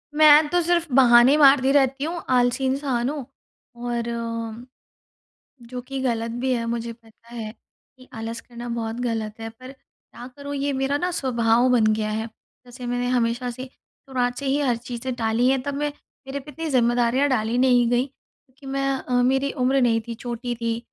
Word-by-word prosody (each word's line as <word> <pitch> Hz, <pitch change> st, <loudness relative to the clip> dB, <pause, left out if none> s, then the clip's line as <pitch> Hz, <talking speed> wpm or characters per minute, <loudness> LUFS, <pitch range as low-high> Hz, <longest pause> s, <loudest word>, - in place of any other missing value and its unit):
मैं 305 Hz, 0 st, +7 dB
तो 355 Hz, 0 st, +2 dB
सिर्फ़ 340 Hz, 0 st, +1 dB
बहाने 245 Hz, +1 st, +7 dB
मारती 275 Hz, -2 st, +6 dB
रहती 270 Hz, -1 st, +2 dB
हूँ, 335 Hz, +2 st, -3 dB
आलसी 245 Hz, +1 st, +2 dB
इंसान 260 Hz, -2 st, 0 dB
हूँ, 290 Hz, -3 st, -5 dB, 0.5 s
और 240 Hz, 0 st, -3 dB, 1.6 s
जो 250 Hz, 0 st, -6 dB
कि 270 Hz, -1 st, -4 dB
गलत 230 Hz, -3 st, -1 dB
भी 260 Hz, 0 st, 0 dB
है, 235 Hz, -2 st, -1 dB
मुझे 230 Hz, 0 st, -3 dB
पता 230 Hz, 0 st, -20 dB
है 220 Hz, -2 st, -5 dB, 0.5 s
कि 255 Hz, 0 st, -17 dB
आलस 225 Hz, +1 st, -5 dB
करना 240 Hz, 0 st, -9 dB
बहुत 225 Hz, -1 st, -3 dB
गलत 225 Hz, -3 st, -3 dB
है, 225 Hz, 0 st, -5 dB
पर 255 Hz, +3 st, -12 dB
क्या 250 Hz, -2 st, -15 dB
करूँ, 285 Hz, 0 st, -6 dB
ये 280 Hz, +1 st, -1 dB
मेरा 270 Hz, +2 st, 0 dB
ना 355 Hz, +4 st, -1 dB
स्वभाव 240 Hz, -4 st, +2 dB
बन 235 Hz, -3 st, +4 dB
गया 215 Hz, 0 st, -2 dB
है। 220 Hz, +1 st, -2 dB, 0.4 s
जैसे 245 Hz, 0 st, -10 dB
मैंने 245 Hz, 0 st, -1 dB
हमेशा 245 Hz, 0 st, 0 dB
से 255 Hz, +2 st, -7 dB
शुरुआत 250 Hz, -1 st, -5 dB
से 280 Hz, -, -5 dB
ही 275 Hz, +2 st, +1 dB
हर 250 Hz, -4 st, +2 dB
चीज़ें 245 Hz, +1 st, -5 dB
टाली 230 Hz, +1 st, +1 dB
हैं, 265 Hz, -1 st, +1 dB
तब 285 Hz, +2 st, -4 dB
मै 295 Hz, +1 st, -1 dB, 0.4 s
मेरे 275 Hz, +1 st, -4 dB
पे 290 Hz, +2 st, -11 dB
इतनी 325 Hz, +3 st, -5 dB
ज़िम्मेदारियाँ 245 Hz, +1 st, +2 dB
डाली 230 Hz, -2 st, 0 dB
नहीं 245 Hz, -2 st, +4 dB
गईं, 245 Hz, +2 st, +2 dB
क्योंकि 275 Hz, 0 st, -24 dB
मैं 275 Hz, 0 st, 0 dB
अ, 255 Hz, -, -6 dB
मेरी 270 Hz, +2 st, +1 dB
उम्र 265 Hz, +1 st, +2 dB
नहीं 230 Hz, -2 st, +3 dB
थी, 235 Hz, -, -4 dB
छोटी 240 Hz, +1 st, -4 dB
थी। 230 Hz, 0 st, -2 dB
250 Hz, 185 wpm, -23 LUFS, 235-270 Hz, 1.6 s, मैं